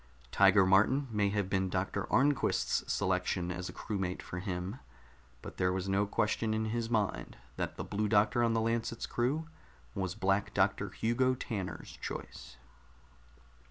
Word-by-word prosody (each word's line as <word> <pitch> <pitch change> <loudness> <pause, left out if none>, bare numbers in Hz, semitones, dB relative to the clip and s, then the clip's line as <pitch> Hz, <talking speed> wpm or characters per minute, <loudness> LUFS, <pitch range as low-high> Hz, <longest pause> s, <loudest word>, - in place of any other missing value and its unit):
Tiger 100 0 +6
Martin 110 +9 +4
may 105 -2 +2
have 100 -1 -1
been 95 -1 0
Doctor 95 +2 -2
Arnquist's 140 +2 +2
selection 90 0 0
as 90 +1 -4
a - - -5
crewmate 95 -4 -3
for 85 - -6
him, 95 +4 -4 0.6
but - - -9
there 90 0 +2
was 95 0 -2
no 100 +1 +1
question 110 +2 0
in 110 0 0
his 115 +1 -2
mind 110 -4 -1 0.2
that - - -3
the - - -4
Blue 105 +1 -1
Doctor 105 +2 +3
on 115 -1 +2
the 115 - +2
Lancet's 115 0 -1
crew 140 +7 -1 0.5
was 95 -1 -3
Black 95 -1 0
Doctor - - +2
Hugo 130 +3 +1
Tanner's 100 -7 -5
choice. - - -7
105 Hz, 155 wpm, -32 LUFS, 95-115 Hz, 0.6 s, Tiger